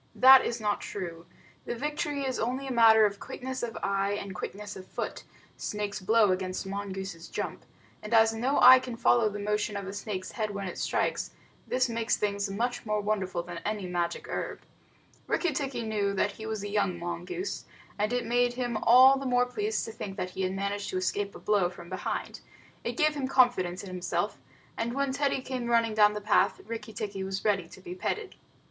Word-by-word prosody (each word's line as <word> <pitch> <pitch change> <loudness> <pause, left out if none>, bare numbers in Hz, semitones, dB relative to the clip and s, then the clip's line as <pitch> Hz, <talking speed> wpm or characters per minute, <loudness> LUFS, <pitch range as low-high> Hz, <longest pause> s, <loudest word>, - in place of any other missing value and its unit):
That 265 0 +9
is 235 - -2
not 210 -1 0
true. 170 -4 -6 0.4
The - - -3
victory 295 +2 -2
is 260 -1 -2
only 255 +4 -1
a 270 - -4
matter 225 -2 +7
of 200 -1 -1
quickness 260 0 -5
of 235 -2 -4
eye 200 0 +1
and 200 -1 -4
quickness 205 +3 -6
of 185 0 -10
foot - - -5 0.3
snake's 210 -1 -3
blow 215 +1 +4
against 185 +1 -2
mongoose's 195 -3 -5
jump - - -4 0.4
and 210 - -8
as 225 -1 +5
no 250 +5 +1
eye 255 +1 +10
can 250 -2 -6
follow 230 -2 +4
the 205 - -6
motion 210 0 -1
of 200 - -5
a 195 - -6
snake's 200 -2 -5
head 215 -2 -2
when 200 -1 -4
it 180 - -6
strikes, - - 0 0.4
this 255 0 +2
makes 230 -1 0
things 200 -1 -1
much 240 +5 -2
more 215 -1 0
wonderful 195 -4 -1
than 175 -1 -7
any 210 +1 -3
magic 175 -1 -2
herb. - - -4 0.7
Rikki 350 -4 +1
tikki 265 -4 -2
knew 205 -3 -1
he 205 +3 -1
was 220 -2 -3
a - - -3
young 195 -4 +1
mongoose, 175 - -4 0.3
and 210 +2 +1
it 245 0 0
made 245 +1 +2
him 245 -2 -2
all 260 +4 +7
the 270 - -3
more 245 0 +3
pleased 415 - -2
to 225 - -6
think 195 -3 -7
that 180 - -3
he 190 - -5
had 185 0 0
managed 200 +1 -2
to 185 - -2
escape 200 +2 -1
a - - -8
blow 205 -4 +2
from 170 -1 -12
behind. 185 - -4 0.4
It - - -3
gave 305 -2 +3
him 280 -3 -2
confidence 240 -10 +3
in 195 - -8
himself, 185 0 -2 0.4
and 235 +1 -2
when 275 -1 0
Teddy 280 -1 0
came 255 -2 -3
running 230 -2 +3
down 210 -1 +5
the 210 - -4
path, 205 0 +3
Rikki 225 0 -6
tikki 200 -2 -4
was 190 +1 -4
ready 195 -5 +1
to 190 - -13
be 180 - -7
petted. 405 - -3
210 Hz, 205 wpm, -29 LUFS, 195-245 Hz, 0.7 s, eye